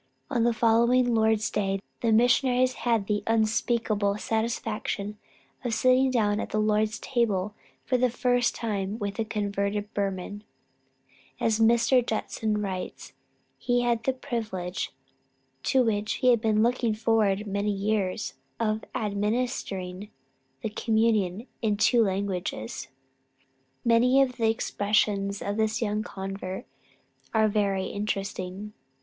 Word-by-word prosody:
On 235 -4 +2
the 240 - +4
following 235 +2 +3
Lord's 220 -1 +2
day, 195 -1 0 0.2
the 230 - +1
missionaries 250 +2 +4 0.2
had 225 -4 +2
the 205 0 0
unspeakable 220 -2 +1
satisfaction 215 -2 -2 0.4
of 235 -3 -1
sitting 255 +2 +4
down 215 -4 +1
at - - -3
the - - -2
Lord's 215 +1 +1
table 210 -5 0 0.3
for 255 - +1
the 250 0 +3
first 245 0 +1
time 205 -3 -2
with 205 -1 -4
a - - +2
converted 205 0 -2
Burman; 200 +1 -3 1.0
and - - +1
as 220 -1 +1
Mr. 235 +3 +4
Judson 215 -1 -2
writes, 185 -2 -5 0.5
he 245 0 +1
had 235 -1 +1
the 265 - +1
privilege 220 -9 -4 0.7
to 260 - +3
which 215 -2 0
he 255 - +2
had 235 -3 +4
been 215 -1 +3
looking 235 -2 +1
forward 215 -2 +2
many 200 +1 -1
years, 200 0 -1 0.3
of 215 -1 0
administering 205 -3 -2 0.5
the - - -1
communion 220 -2 +1 0.2
in 210 -3 +1
two 235 +2 +4
languages. 190 - -3 1.0
Many 240 +3 +5
of 255 -2 -3
the 225 -2 +2
expressions 205 -2 0
of 205 +1 -2
this 220 +1 +1
young 210 -2 0
convert 195 0 -6 0.7
are 220 0 +5
very 200 -2 0
interesting. 200 0 -4
215 Hz, 130 wpm, -27 LUFS, 200-235 Hz, 1.0 s, Many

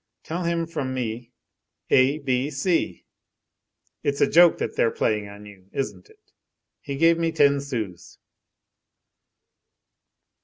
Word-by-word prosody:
Tell 170 +2 -4
him 170 0 0
from 145 -6 -4
me: 120 -1 -4 0.6
"A 135 +3 +4
B 135 -1 -1
C".' 155 +5 -1 1.0
It's 140 0 -1
a - - +5
joke 175 +1 +5
that - - -4
they're 115 - +3
playing 105 -2 -1
on 100 +1 -12
you, 100 -2 -15
isn't 105 -9 -4
it. - - -25 0.5
He 140 - -5
gave 165 +2 +4
me 165 -1 0
ten 140 -3 +3
sous." 110 -11 -6
135 Hz, 125 wpm, -24 LUFS, 110-160 Hz, 1.0 s, a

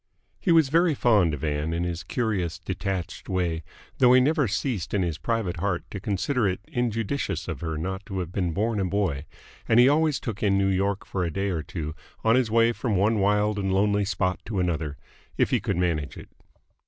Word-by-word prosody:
He 180 - +1
was 160 -4 +5
very 165 +1 +3
fond 105 -10 +3
of 70 - -10
Ann 75 +1 -1
in 85 +1 -1
his 85 -1 -3
curious, 90 -3 -2
detached 95 0 -4
way, 85 -3 0 0.4
though 125 -1 +6
he 130 - +7
never 145 +1 +2
ceased 105 - -2
in 95 - +2
his 85 -3 -2
private 110 -7 -1
heart 90 0 -1
to 100 - -5
consider 105 +5 0
it 95 - -1
injudicious 120 -2 -2
of - - -5
her 80 -2 -3
not 95 +5 -4
to 95 - -5
have 90 -2 -3
been 90 -3 -1
born 105 +4 0
a 95 - +1
boy, 90 -7 -1 0.4
and 115 +1 +5
he 125 - +8
always 150 0 +3
took 110 -4 -5
in 100 -2 +3
New 100 0 +2
York 100 +1 0
for 95 - -2
a 85 - 0
day 100 +5 -2
or 85 -4 -1
two 80 -1 -5 0.3
on 115 +1 +4
his 125 -3 +2
way 115 +1 +4
from 115 -2 -2
one 105 +3 +2
wild 105 +1 +2
and 95 -1 -1
lonely 100 +1 +2
spot 95 -1 -1
to 105 -4 -3
another, 80 -5 -1 0.4
if - - +2
he - - +3
could - - -2
manage 85 -5 -1
it. - - -11
100 Hz, 215 wpm, -26 LUFS, 90-115 Hz, 0.4 s, he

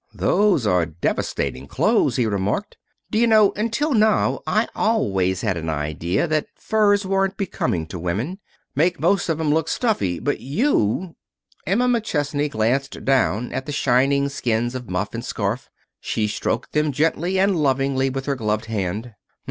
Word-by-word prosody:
"Those 200 - +2
are 90 -4 +2
devastating 75 -4 -2
clothes," 160 - +2
he 125 - +2
remarked. 105 - -1 0.4
"D'you 230 +2 +3
know, 215 -3 +5
until 230 +8 0
now 215 -2 +3
I 215 +2 +2
always 95 - +1
had 105 -5 0
an 80 0 -4
idea 80 - -1
that 155 -1 0
furs 205 -2 +2
weren't 195 0 0
becoming 95 - -2
to 90 +2 -7
women. 110 - -3 0.3
Make 170 +4 +1
most 175 +4 +1
of 160 -1 0
'em 150 -2 +1
look 160 0 +1
stuffy. 165 - 0
But 145 - -2
you 165 - 0 0.3
" - - -35
Emma 230 +8 +2
McChesney 150 - 0
glanced 130 +4 -1
down 125 -4 +1
at 130 +2 -4
the - - -3
shining 140 0 +2
skins 120 -3 -1
of 125 -2 -6
muff 95 +3 -2
and 115 0 -4
scarf. 115 +2 -3 0.3
She 110 -1 -1
stroked 115 +3 -2
them 150 0 +2
gently 165 +6 0
and 195 0 +3
lovingly 135 -3 +1
with 135 0 -4
her 140 - 0
gloved 110 -2 -1
hand. 110 +2 -3
135 Hz, 160 wpm, -22 LUFS, -, 0.4 s, know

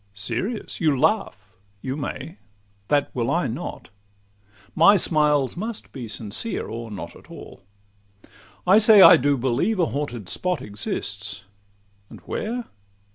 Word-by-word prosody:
Serious? 120 - -4
You 155 -4 +2
laugh;—you 105 - -2
may: 150 -2 -6 0.5
that 145 -1 +1
will 120 -2 -1
I - - +1
not; - - -6 0.8
My 170 +6 +6
smiles 150 -6 +2
must 220 +4 -6
be 125 -4 -7
sincere 110 - -4
or 115 0 -7
not 105 -3 -8
at - - -17
all. - - -11 1.0
I 190 +4 +6
say 215 -2 +7
I 180 - +10
do 145 -1 +1
believe 135 - 0
a 175 - +3
haunted 130 - -4
spot 180 - -1
Exists—and 100 -1 -7
where? 235 +2 -4
135 Hz, 125 wpm, -23 LUFS, -, 1.0 s, I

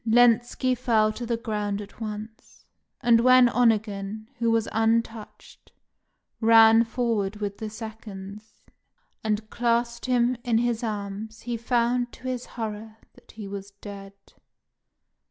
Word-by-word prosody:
Lenski 240 +2 +3
fell 220 -3 +2
to 240 +1 -6
the 235 -1 0
ground 210 -3 -3
at 205 +2 -11
once; 215 +1 -8 0.4
and 235 -2 +5
when 255 0 +7
Onegin, 215 -3 0
who 235 -1 +1
was 225 -1 +1
untouched, 225 -1 -2 0.7
ran 225 0 +7
forward 225 -4 -1
with 205 -1 -5
the 220 -1 -4
seconds, 215 -1 -10 0.6
and 215 0 -1
clasped 235 0 0
him 250 0 +2
in 235 -2 +1
his 240 0 0
arms, 215 0 -5
he 240 -1 -3
found 240 +1 0
to - - -15
his 250 -1 -3
horror 220 -1 -5 0.2
that - - -19
he 215 -2 -8
was 200 0 -7
dead. 200 -1 -9
225 Hz, 130 wpm, -25 LUFS, 210-235 Hz, 0.7 s, when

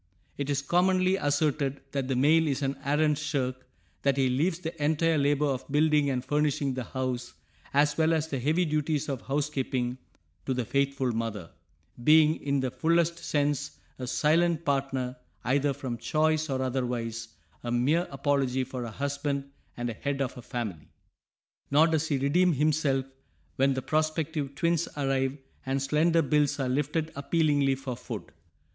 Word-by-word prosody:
It 140 0 -3
is 140 0 0
commonly 185 +3 +3
asserted 145 -3 0
that 135 -2 -2
the 130 - 0
male 155 +5 +4
is 140 0 -1
an 135 0 0
arrant 150 +1 +2
shirk, 130 -4 -2 0.3
that 140 -1 +2
he 135 -1 +3
leaves 160 +7 +1
the 165 -3 -5
entire 160 +1 +2
labor 145 +1 +2
of 135 -2 -2
building 150 0 +3
and 125 -2 -2
furnishing 145 -2 +1
the 130 -1 -4
house 130 -2 -3 0.4
as 145 +1 +3
well 160 0 +4
as 160 -1 +1
the 140 -4 -3
heavy 155 +8 +2
duties 150 -1 0
of 135 -3 -3
housekeeping 135 -3 -2 0.5
to 130 - 0
the 125 -2 -1
faithful 140 0 0
mother, 110 -6 -4 0.5
being 155 +2 +6
in 140 -1 -1
the 130 -1 -1
fullest 170 +5 +1
sense 145 -3 -1 0.2
a 125 - -4
silent 165 +4 +2
partner 135 -2 -1 0.3
either 140 +3 +2
from 125 -3 -5
choice 155 +4 +1
or 130 -1 -1
otherwise, 120 -3 -2 0.4
a 120 - -3
mere 145 +9 +2
apology 135 -2 0
for 130 -1 -5
a - - -5
husband 140 +2 -3 0.3
and 120 0 -2
head 140 +5 -3
of 135 -3 -2
a 125 - -8
family. 105 -11 -5 0.8
Nor 150 +3 +6
does 160 -1 +1
he 145 - +1
redeem 165 +7 +3
himself 145 -2 +1 0.5
when 135 0 +3
the 130 - -3
prospective 155 -2 -1
"twins" 170 +2 +1
arrive 135 -1 0 0.3
and 135 +1 -1
slender 155 +4 +2
bills 145 0 +2
are 130 -2 0
lifted 150 +4 -1
appealingly 145 -2 +2
for 130 -2 -5
food! 70 - -7
140 Hz, 160 wpm, -28 LUFS, 130-155 Hz, 0.8 s, being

